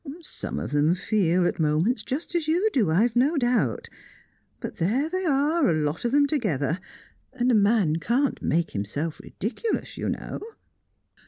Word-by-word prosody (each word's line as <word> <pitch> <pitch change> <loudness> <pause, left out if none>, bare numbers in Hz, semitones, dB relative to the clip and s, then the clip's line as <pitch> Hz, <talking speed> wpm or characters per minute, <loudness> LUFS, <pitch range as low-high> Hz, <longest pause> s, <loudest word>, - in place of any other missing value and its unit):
Some - - -5
of - - -5
them 150 +4 +3
feel, 185 -2 +1
at 175 - -1
moments, 160 - +1
just 280 +10 -4
as 335 -3 0
you 360 +7 +2
do, 220 -10 +2
I've 215 +9 +2
no 280 +7 +3
doubt; 245 -2 +1 0.7
but - - -6
there 230 - +1
they 370 +2 -2
are, 290 +1 +2
a - - +3
lot 155 +5 -1
of 235 - +1
them 285 +1 +4
together, 180 - 0 0.5
and 250 -1 +1
a - - +3
man 200 -6 +3
can't 245 +10 0
make 165 0 0
himself 140 +11 -3
ridiculous, 245 - -4
you - - -2
know." - - -4
225 Hz, 165 wpm, -25 LUFS, -, 0.7 s, them